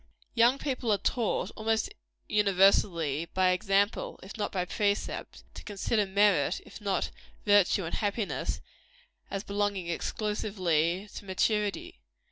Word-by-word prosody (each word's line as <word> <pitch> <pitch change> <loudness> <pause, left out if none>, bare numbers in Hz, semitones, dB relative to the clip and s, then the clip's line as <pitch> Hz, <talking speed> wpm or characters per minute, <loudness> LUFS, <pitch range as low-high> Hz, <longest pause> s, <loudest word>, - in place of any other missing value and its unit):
Young 240 +3 +5
people 255 -5 -1
are 205 - +4
taught, 220 -3 0
almost 225 - 0 0.3
universally 185 -6 +3
by 185 -1 +4
example, 195 +3 +1
if 190 - -9
not 210 -2 -2
by 180 -2 -1
precept 205 +2 -2
to - - -10
consider 205 0 0
merit, 190 -4 +3
if - - -12
not 200 -2 -1 0.3
virtue 205 -2 +4
and 165 - -5
happiness, 205 0 -2 0.7
as 195 0 -3
belonging 200 -3 -1
exclusively 185 -2 -1
to - - -8
maturity. 205 - -1
200 Hz, 120 wpm, -29 LUFS, 185-210 Hz, 0.7 s, Young